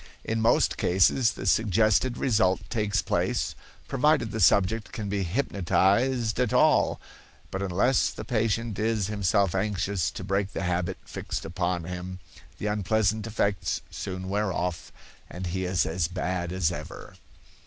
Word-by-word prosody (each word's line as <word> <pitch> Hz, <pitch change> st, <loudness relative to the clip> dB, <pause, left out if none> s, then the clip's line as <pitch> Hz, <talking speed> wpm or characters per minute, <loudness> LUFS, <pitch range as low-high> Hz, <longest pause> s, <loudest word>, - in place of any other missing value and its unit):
In 110 Hz, 0 st, -1 dB
most 115 Hz, +2 st, +3 dB
cases 95 Hz, +6 st, +3 dB
the -, -, -7 dB
suggested 110 Hz, +4 st, +2 dB
result 105 Hz, -7 st, +1 dB
takes 105 Hz, -3 st, 0 dB
place, -, -, 0 dB, 0.3 s
provided 135 Hz, -5 st, +2 dB
the 110 Hz, -, -3 dB
subject 100 Hz, +3 st, +3 dB
can 105 Hz, -3 st, -5 dB
be 100 Hz, 0 st, -1 dB
hypnotized 110 Hz, +4 st, +1 dB
al 125 Hz, -3 st, +3 dB
all; -, -, +3 dB, 0.5 s
but 95 Hz, -, -3 dB
unless 100 Hz, +7 st, +2 dB
the -, -, -8 dB
patient 115 Hz, -2 st, -1 dB
is 110 Hz, -2 st, 0 dB
himself 100 Hz, -2 st, +2 dB
anxious 95 Hz, -2 st, 0 dB
to -, -, -7 dB
break 95 Hz, 0 st, -1 dB
the -, -, -3 dB
habit 90 Hz, +1 st, -1 dB
fixed -, -, -5 dB
upon 85 Hz, +1 st, -2 dB
him, 90 Hz, +1 st, -6 dB, 0.4 s
the -, -, -6 dB
unpleasant 105 Hz, +1 st, 0 dB
effects 100 Hz, -3 st, -1 dB
soon 95 Hz, 0 st, -5 dB
wear 100 Hz, +1 st, 0 dB
off 90 Hz, -1 st, -3 dB, 0.4 s
and 90 Hz, +1 st, -6 dB
he 95 Hz, 0 st, -1 dB
is 90 Hz, -3 st, +1 dB
as 80 Hz, 0 st, -1 dB
bad 90 Hz, -1 st, -3 dB
as 90 Hz, -2 st, +1 dB
ever. -, -, -8 dB
100 Hz, 145 wpm, -27 LUFS, 90-110 Hz, 0.5 s, most